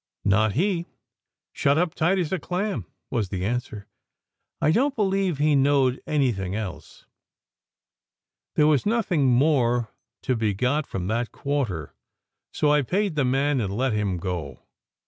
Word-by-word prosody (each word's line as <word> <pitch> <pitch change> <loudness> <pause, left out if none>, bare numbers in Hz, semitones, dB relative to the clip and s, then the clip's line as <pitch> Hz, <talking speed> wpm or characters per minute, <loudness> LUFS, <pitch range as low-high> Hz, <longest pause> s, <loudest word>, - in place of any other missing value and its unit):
"Not 105 +1 +3
he! 175 - 0 0.7
Shut 140 +1 +2
up 175 -1 +1
tight 175 +5 +1
as 175 -5 -1
a 190 - 0
clam," 180 - -3 0.3
was 110 -6 0
the 95 -1 -3
answer. 120 -2 -3 0.7
"I 155 - +3
don 260 - +3
t 275 - -14
believe 195 -5 +1
he 150 +1 +2
knowed 135 -2 +3
anything 115 -11 0
else." 90 -8 -7 1.5
There 150 - +4
was 150 -3 +3
nothing 190 - +1
more 120 -3 +2 0.3
to 130 - +1
be 110 -3 0
got 135 +8 0
from 90 -2 -4
that 115 +4 -1
quarter, 120 - -3 0.6
so 150 - +1
I 150 0 +4
paid 195 - 0
the 150 -2 +1
man 135 +1 +1
and 100 -1 -3
let 130 -1 +1
him 105 -4 -1
go. 85 -7 -5
135 Hz, 150 wpm, -25 LUFS, 105-155 Hz, 1.5 s, There